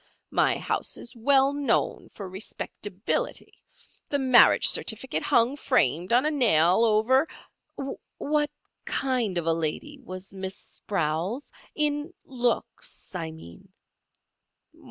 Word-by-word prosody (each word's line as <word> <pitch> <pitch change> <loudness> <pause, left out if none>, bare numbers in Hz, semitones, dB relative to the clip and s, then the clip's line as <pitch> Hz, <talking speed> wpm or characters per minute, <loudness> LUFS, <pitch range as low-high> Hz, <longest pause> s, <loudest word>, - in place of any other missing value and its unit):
My - - +3
house - - -2
is 240 - -9
well 270 +3 +3
known 285 -5 0
for 200 - -6
respectability. 200 - -4 0.6
The 285 - +1
marriage 260 -3 +6
certificate 230 +3 0
hung, 235 +4 +3
framed, 175 - +1
on 245 +4 +4
a 305 - +2
nail 200 - +4
over—" 235 +7 +3 0.9
"What 295 0 0 0.3
kind 245 -8 -1
of 170 - -1
a 165 - +3
lady 165 - -3
was 185 -6 -8
Miss 190 0 -4
Sprowls—in 255 - -3
looks, 245 -5 -3
I 165 -3 -3
mean?" 160 - -13
230 Hz, 110 wpm, -26 LUFS, 185-275 Hz, 0.9 s, marriage